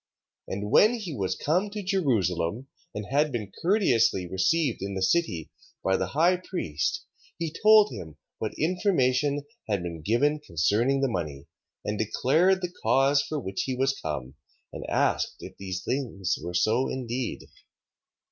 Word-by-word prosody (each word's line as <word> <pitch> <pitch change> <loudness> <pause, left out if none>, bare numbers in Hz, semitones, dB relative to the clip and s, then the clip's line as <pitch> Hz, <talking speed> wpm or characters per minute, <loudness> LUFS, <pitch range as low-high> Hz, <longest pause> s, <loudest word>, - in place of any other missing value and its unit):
3:9. - - -3
And 105 +2 -4
when 215 +3 +6
he 200 -9 -5
was 95 -4 -1
come 180 +7 0
to 205 0 -5
Jerusalem, 115 - 0 0.3
and 105 0 -4
had 145 +2 +2
been 105 -6 -4
courteously 125 - +3
received 110 - +1
in 100 0 -4
the 95 - -3
city 95 - 0 0.3
by 95 - +2
the - - -1
high 170 +5 +3
priest, 90 - -3 0.3
he 165 -2 -3
told 215 -1 +7
him 80 -3 -8 0.2
what 110 - -3
information 145 -6 +1 0.3
had 100 -4 0
been 85 -2 -5
given 145 - +2
concerning 115 - +1
the 135 - +3
money: 75 - -4 0.4
and 105 0 -2
declared 165 - +2
the 180 0 -3
cause 140 +2 +4
for 150 +1 -3
which 95 -6 -3
he 130 - -2
was 135 +2 +1
come: 65 -3 -4 0.4
and - - -6
asked - - +1
if - - -9
these 95 -1 -4
things 110 -9 -1
were 90 0 -5
so 115 +8 +2
indeed. 125 -1 -3
125 Hz, 155 wpm, -27 LUFS, 95-160 Hz, 0.4 s, told